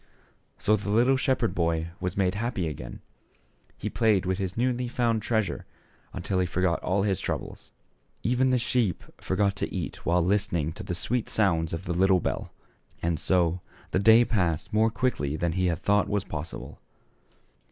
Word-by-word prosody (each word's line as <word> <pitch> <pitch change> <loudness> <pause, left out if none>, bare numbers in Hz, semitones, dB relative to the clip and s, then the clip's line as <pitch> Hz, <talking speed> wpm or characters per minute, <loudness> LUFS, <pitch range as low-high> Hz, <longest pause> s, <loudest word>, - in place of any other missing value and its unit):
So 105 +1 +3
the 100 0 -4
little 120 +6 +4
shepherd 130 -3 +1
boy 85 -1 0
was 90 0 -3
made 95 -2 +2
happy 105 -4 -2
again; 60 -6 -7 0.8
he - - -4
played 105 -5 +2
with 95 +1 -1
his 95 +1 -3
newly 125 0 0
found 120 -2 0
treasure 110 -1 -1 0.4
until 95 - -2
he 90 - +1
forgot 90 0 0
all 95 +2 +1
his 95 -2 0
troubles; - - -5 0.5
even 125 +2 +2
the 130 - +3
sheep 120 -6 0 0.2
forgot 100 +1 0
to - - -2
eat - - -5
while 85 0 +2
listening 90 -5 +1
to - - -9
the 90 - -4
sweet 120 +6 -2
sounds 85 -7 +2
of 85 +4 -5
the 85 - -1
little 95 +1 +4
bell. - - -3 0.5
And 85 -2 0
so 90 0 +1 0.3
the - - +2
day 110 +4 +7
passed 90 -9 -1
more 110 +1 +4
quickly 115 - -1
than 85 +2 0
he 90 +2 +1
had 85 0 -2
thought 105 0 +3 0.2
possible. 80 +1 -6
95 Hz, 170 wpm, -27 LUFS, 85-110 Hz, 0.8 s, day